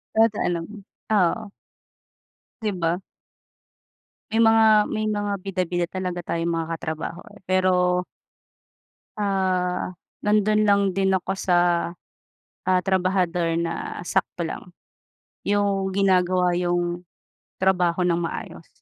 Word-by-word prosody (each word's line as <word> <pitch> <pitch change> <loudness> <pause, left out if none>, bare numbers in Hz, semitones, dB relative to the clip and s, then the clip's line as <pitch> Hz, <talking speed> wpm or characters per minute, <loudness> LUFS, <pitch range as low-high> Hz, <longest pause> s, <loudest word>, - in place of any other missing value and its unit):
Totoo 220 -1 +3
naman, 175 +4 -4 0.3
oo. 205 +1 +2 1.1
Di 215 -2 0
ba? 170 -1 0 1.3
May 225 +1 +4
mga 225 0 +6 0.3
may 215 0 -1
mga 205 -1 -1
bida-bida 180 -2 -2
talaga 180 -1 -4
tayong 170 0 -2
mga 165 -1 -2
ka-trabaho 160 +1 -5
eh - - -15
pero 180 -1 +2 1.1
ah, 185 -3 0 0.3
nandun 210 0 +3
lang 200 0 +5
din 190 0 +1
ako 190 +1 -2
sa, 180 -2 +1 1.1
ah, 185 0 +4
trabahador 180 -3 +1
na 170 0 -3
sakto 180 -3 -1
lang. 180 - -7 0.8
Yung 200 -2 +1
ginagawa 180 -2 +3
yung 175 0 -1 0.6
trabaho 180 -2 +2
nang 175 -1 +2
maayos. 170 - -5
185 Hz, 105 wpm, -24 LUFS, 175-200 Hz, 1.3 s, mga